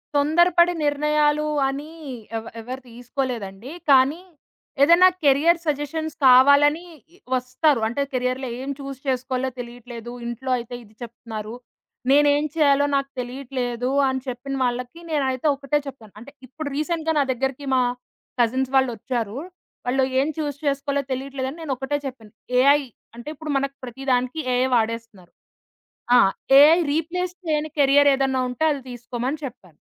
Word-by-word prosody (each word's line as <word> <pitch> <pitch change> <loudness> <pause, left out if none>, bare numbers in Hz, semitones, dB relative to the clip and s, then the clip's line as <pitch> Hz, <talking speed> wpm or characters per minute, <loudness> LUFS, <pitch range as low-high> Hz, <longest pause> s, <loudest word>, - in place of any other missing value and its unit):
తొందరపడి 345 +4 +4
నిర్ణయాలు 300 +1 +2 0.2
అని 285 +4 -6 0.5
ఎవ్ 225 - -7
ఎవరు 255 +3 -7
తీసుకోలేదండి. 240 -2 -5 0.2
కానీ, 275 +5 +4 0.6
ఏదైనా 340 +5 +7 0.2
కేరియర్ 295 +5 +4
సజెషన్స్ 305 +1 -2
కావాలని 285 +6 +6 0.5
వస్తారు. 255 +2 +1
అంటే, 240 +5 -2
కేరియర్‌లో 255 0 -2
ఏం 270 - -5
చూస్ 275 -1 -7
చేసుకోవాలో 260 0 -1
తెలీట్లేదు, 240 -1 -8 0.2
ఇంట్లో 250 +2 -4
అయితే 240 +1 -7
ఇది 215 -1 -20
చెప్తున్నారు. 230 -2 -7 0.6
నేను 290 +1 +5
ఏమి 300 +1 -1
చేయాలో 285 -2 +4
నాకు 275 0 0
తెలీట్లేదు, 250 -1 -3 0.2
అని 260 0 -2
చెప్పిన 260 +2 -4
వాళ్ళకి 250 +5 -3
నేనైతే 270 -1 0
ఒకటే 280 +1 -1
చెప్తాను. 230 -7 -11
అంటే, 280 +4 -12 0.2
ఇప్పుడు 295 +3 -6
రీసెంట్‌గా 320 +1 -1
నా 285 - +4
దగ్గరికి 265 +2 -3
మా 255 - +4 0.6
కజిన్స్ 260 +3 0
వాళ్ళొచ్చారు. 240 -2 -1 0.5
వాళ్ళు, 260 +2 +1 0.2
"ఏం 275 - +1
చూస్ 290 -3 -2
చేసుకోవాలో 280 0 0
తెలియట్లేదు 265 0 -3
అని" 310 - -10
నేను 290 -4 -2
ఒకటే 270 +3 -2
చెప్పాను 230 -5 -8 0.3
ఏఐ 280 +3 +5 0.3
అంటే 240 +4 -11
ఇప్పుడు 310 0 -6
మనకి 275 0 -2
ప్రతి 255 +2 -8
దానికి 250 +4 0
ఏఐ 250 +1 +2
వాడేస్తున్నారు. 225 -5 -3 0.9
ఆ! - - +8 0.4
ఏఐ 310 +4 +8
రీప్లేస్ 350 +3 -2
చేయని 310 -1 -1
కేరియర్ 285 +1 +5
ఏదైనా 265 -1 0
ఉంటే, 250 +5 -2
అది 285 -2 -2
తీసుకోమని 245 +3 -4
చెప్పాను. 220 - -10
270 Hz, 135 wpm, -23 LUFS, 245-290 Hz, 0.9 s, ఆ